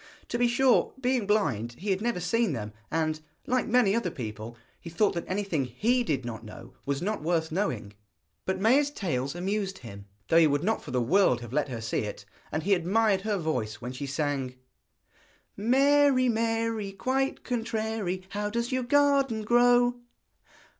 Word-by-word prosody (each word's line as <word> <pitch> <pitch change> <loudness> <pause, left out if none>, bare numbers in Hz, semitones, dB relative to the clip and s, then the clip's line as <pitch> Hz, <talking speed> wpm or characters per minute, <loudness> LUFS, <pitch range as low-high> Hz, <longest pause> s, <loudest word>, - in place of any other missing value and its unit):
To 240 - -2
be 245 - +4
sure, 250 +1 +3
being 250 -5 0
blind, 130 - +1
he 195 - -3
had 190 +1 0
never 235 -5 -1
seen 225 +1 +1
them, 105 -4 -5 0.2
and, 155 -1 -1 0.2
like 255 +1 0
many 240 -4 +3
other 230 -6 0
people, 115 -4 -7 0.2
he 170 - -9
thought 200 +5 +2
that 170 - -5
anything 185 -7 -1
he 230 - +1
did 140 - -1
not 115 -1 -6
know 115 +2 -11
was 140 +2 -1
not 210 -1 -2
worth 160 0 0
knowing. 125 - -2 0.5
But 190 0 -1
Maia's 265 +8 +4
tales 150 - -3
amused 195 +1 -2
him, 100 - -11 0.2
though 165 - +5
he 160 - +6
would 145 +1 0
not 220 +4 0
for - - -11
the 125 0 0
world 135 -3 +3
have 120 0 -9
let 150 0 0
her 120 -3 -5
see 110 - -1
it, - - -5 0.3
and 155 - -2
he 200 +3 +3
admired 195 +3 +2
her 210 0 -1
voice 155 - -2
when 120 +2 -7
she 130 +2 -5
sang: 135 -2 -2 1.0
Mary, 265 +3 +4
Mary, 225 -2 -1
quite 265 +6 -1
contrary, 220 -5 -2
How 205 +1 -2
does 235 +3 -2
your 255 0 0
garden 275 -3 +2
grow? 245 +1 +4
195 Hz, 175 wpm, -28 LUFS, 145-235 Hz, 1.0 s, he